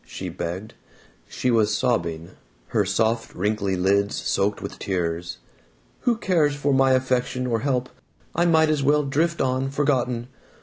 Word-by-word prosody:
she - - -7
begged. 95 +6 -5 0.5
She 125 - -1
was 110 -2 +2
sobbing, 85 -9 -1 0.4
her 105 -3 +1
soft 110 +4 0
wrinkly 100 0 0
lids 100 +3 +1
soaked 100 +1 0
with - - -7
tears. 85 -3 -2 0.6
"Who 240 -2 +1
cares 165 -9 +2
for 145 -1 0
my 135 0 +4
affection 125 0 0
or 115 -2 0
help? 130 0 0 0.5
I 175 +1 +2
might 160 -2 +4
as 150 -2 0
well 145 +2 +3
drift 160 +5 0
on, 130 +1 0
forgotten. 130 -4 0
125 Hz, 145 wpm, -24 LUFS, 100-140 Hz, 0.6 s, my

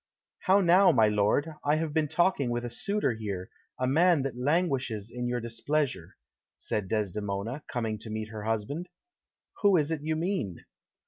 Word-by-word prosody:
"How 195 +1 +4
now, 185 +2 +6
my 110 -3 +4
lord; 105 +10 +1
I 145 +1 +3
have 155 -1 -2
been 155 -1 +2
talking 170 -5 +2
with 120 0 -2
a 120 - -5
suitor 200 - 0
here, 100 -4 -5 0.3
a 130 - +1
man 160 +3 +4
that 135 -3 -3
languishes 130 - 0
in 125 0 -3
your 120 0 -1
displeasure," 120 - -2 0.4
said 105 -3 -3
Desdemona, 105 +4 -2
coming 110 -3 -2
to 110 - -9
meet 110 0 -4
her 110 -1 -7
husband. 115 - -2 0.7
"Who 200 -3 +5
is 150 0 +1
it 160 -3 -2
you 155 +1 -1
mean?" 160 - -2
125 Hz, 170 wpm, -29 LUFS, 110-160 Hz, 0.7 s, now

